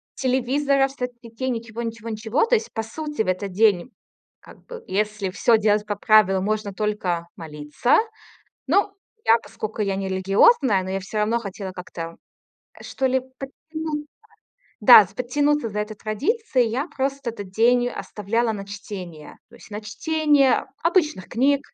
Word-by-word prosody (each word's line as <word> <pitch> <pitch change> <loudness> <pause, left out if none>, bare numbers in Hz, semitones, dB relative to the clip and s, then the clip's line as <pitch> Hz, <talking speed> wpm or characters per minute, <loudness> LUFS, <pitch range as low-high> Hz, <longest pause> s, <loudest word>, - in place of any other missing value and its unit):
телевизоров, 270 +2 +1
соцсетей, 250 -1 -5
ничего-ничего-ничего. 230 - -2
То 480 - +3
есть 455 0 -2
по 225 - -2
сути 295 +4 -4
в - - -9
этот 185 +2 -2
день, 205 +2 +2 0.5
как - - -17
бы 475 -1 -8
если 210 0 -1
всё 225 +4 +3
делать 210 -1 +2
по 205 - -2
правилам, 200 -3 +4
можно 215 -1 -2
только 190 -5 -2
молиться. 150 +7 0 0.7
Ну, 400 +7 +2 0.3
я, 230 - +6
поскоку, 215 -1 -6
я 195 -1 0
не 195 0 -3
религиозная, 195 - +4
но 185 - -5
я 195 - -1
всё 200 +3 -6
равно 220 +3 +1
хотела 200 -3 -6
как-то, 170 -2 -7 0.7
что 265 - -3
ли, 260 0 +2 0.2
подтянуться, 300 +2 -6 0.7
да, 215 -3 +9
с - - -19
подтянуться 290 +2 0
за 210 0 -3
этой 210 +1 -4
традицией, 255 - 0
я 265 +7 -1
просто 275 -3 -2
этот 205 -4 -9
день 245 +4 +3
оставляла 230 0 -2
на 200 -2 -6
чтение, 195 -6 -9
то 235 - -17
есть 235 - -16
на 210 0 -5
чтение 295 +3 +2 0.2
обычных 325 - +1
книг 270 +4 +2
225 Hz, 150 wpm, -23 LUFS, 200-270 Hz, 0.7 s, да